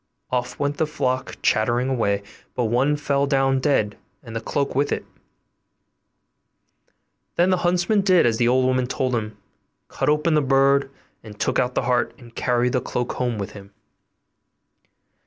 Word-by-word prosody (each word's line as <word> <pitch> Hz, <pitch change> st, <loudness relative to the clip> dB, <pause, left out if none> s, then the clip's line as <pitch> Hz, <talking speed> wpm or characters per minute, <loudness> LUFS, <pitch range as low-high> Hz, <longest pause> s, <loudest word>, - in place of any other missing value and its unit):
Off 125 Hz, -1 st, -2 dB
went 145 Hz, 0 st, -1 dB
the 160 Hz, -, +1 dB
flock 130 Hz, -4 st, -2 dB
chattering 120 Hz, +3 st, +2 dB
away; 100 Hz, -6 st, 0 dB, 0.3 s
but 125 Hz, -, 0 dB
one 125 Hz, +6 st, +2 dB
fell 140 Hz, -1 st, 0 dB
down 135 Hz, -1 st, +2 dB
dead, 120 Hz, -7 st, 0 dB, 0.2 s
and 115 Hz, -3 st, -9 dB
the 115 Hz, -, -2 dB
cloak 140 Hz, +4 st, -2 dB
with 140 Hz, +2 st, 0 dB
it. -, -, -2 dB, 2.3 s
Then 180 Hz, +2 st, +3 dB
the 185 Hz, -, +3 dB
huntsman 180 Hz, +4 st, +2 dB
did 185 Hz, -3 st, +4 dB
as 115 Hz, -2 st, +2 dB
the 120 Hz, -, +2 dB
old 130 Hz, +1 st, +3 dB
woman 130 Hz, -1 st, +1 dB
told 130 Hz, 0 st, -1 dB
him, 110 Hz, -2 st, -3 dB, 0.5 s
cut -, -, -1 dB
open 150 Hz, +2 st, +2 dB
the 150 Hz, -, +4 dB
bird, 135 Hz, 0 st, +3 dB, 0.5 s
took 130 Hz, -, 0 dB
out 125 Hz, 0 st, 0 dB
the -, -, +1 dB
heart, 125 Hz, 0 st, 0 dB
and 120 Hz, -4 st, -15 dB
carried 125 Hz, 0 st, 0 dB
the 125 Hz, -, +1 dB
cloak 125 Hz, 0 st, -3 dB
home 125 Hz, -3 st, -2 dB
with 100 Hz, -2 st, -5 dB
him. 100 Hz, -1 st, -13 dB
130 Hz, 160 wpm, -23 LUFS, 120-145 Hz, 2.3 s, did